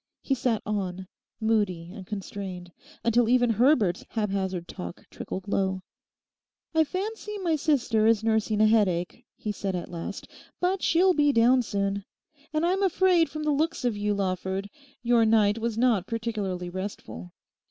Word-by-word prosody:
He 275 - 0
sat 240 -4 0
on, 190 -3 -3 0.3
moody 205 -7 0
and 195 -3 -10
constrained, 190 -3 -6 0.3
until 235 0 +3
even 245 -1 +4
Herbert's 225 - +3
haphazard 190 -5 -2
talk 85 - -8
trickled 190 +1 -6
low. 190 -2 0 0.9
'I 320 0 +4
fancy 420 +4 -4
my 345 -5 0
sister 250 -8 +2
is 225 -1 +3
nursing 220 -1 +1
a - - +6
headache,' 210 0 +1
he 215 - -4
said 195 -2 -3
at 175 0 -5
last, 170 -1 -6 0.3
'but 365 +1 0
she'll 365 +3 +4
be 290 -3 +3
down 250 +1 +4
soon. 200 -2 -2 0.5
And 310 +2 +1
I'm 375 +3 +1
afraid 365 -3 +3
from 305 0 -5
the 300 - +1
looks 310 -1 0
of 240 -3 +1
you, 205 0 0
Lawford, 190 +1 -2 0.3
your 235 -1 +4
night 220 -1 +3
was 225 -1 -2
not 230 -6 +2
particularly 205 -6 -3
restful. 185 - -6
220 Hz, 155 wpm, -27 LUFS, 190-255 Hz, 0.9 s, a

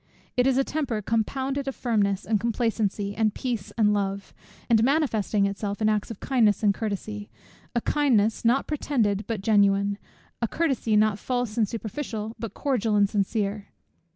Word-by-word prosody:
It 250 +1 +3
is 265 -1 +3
a 270 - +4
temper 275 -7 -2
compounded 265 +6 -1
of 270 - -3
firmness, 205 -5 0
and 215 -1 +1
complacency, 215 -3 -1
and 215 -1 +1
peace, 235 -7 -3
and 210 -2 +4
love; 200 -1 -2 0.3
and 225 -2 +4
manifesting 230 -8 +2
itself 200 +1 -3
in 215 -1 +2
acts 210 -1 0
of 230 - -7
kindness 225 -6 +2
and 205 -1 +4
of - - -16
courtesy; 210 -1 -4 0.5
a 235 - +2
kindness, 225 -8 +2
not 240 +4 +3
pretended 230 -9 0
but 225 -4 -3
genuine; 200 -1 +3 0.4
a 235 - +2
courtesy, 270 -7 0
not 210 -1 +3
false 245 -3 -2
and 220 -4 +1
superficial, 225 -1 -5
but 225 -4 -6
cordial 235 -7 0
and 200 -1 +4
sincere. 205 0 -1
220 Hz, 165 wpm, -26 LUFS, 205-245 Hz, 0.5 s, a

